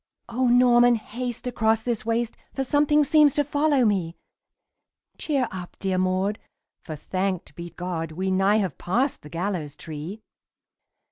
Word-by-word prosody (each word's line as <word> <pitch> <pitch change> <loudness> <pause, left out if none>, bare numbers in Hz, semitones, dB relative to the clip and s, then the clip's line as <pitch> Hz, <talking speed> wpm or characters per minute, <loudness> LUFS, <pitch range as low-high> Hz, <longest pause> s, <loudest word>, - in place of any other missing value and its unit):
"O 245 +2 0
Norman, 245 0 +5
haste 240 +2 -5
across 225 -2 +1
this 235 -2 -2
waste 230 0 0 0.2
For 270 - 0
something 295 +2 +3
seems 295 -1 +4
to 290 - +3
follow 290 -2 +2
me!" 185 -6 0 1.0
"Cheer 275 -5 0
up, 180 -2 -8
dear 190 -1 -1
Maud, 185 +3 0 0.4
for, 155 - -6
thanked 185 +3 -3
be 170 0 -8
God, 170 -2 -4
We 190 +3 -2
nigh 195 +2 +3
have 195 -4 -2
passed 250 +10 0
the 150 - -12
gallows 170 -4 -3
tree!" 165 +8 -7
215 Hz, 145 wpm, -25 LUFS, 185-250 Hz, 1.0 s, Norman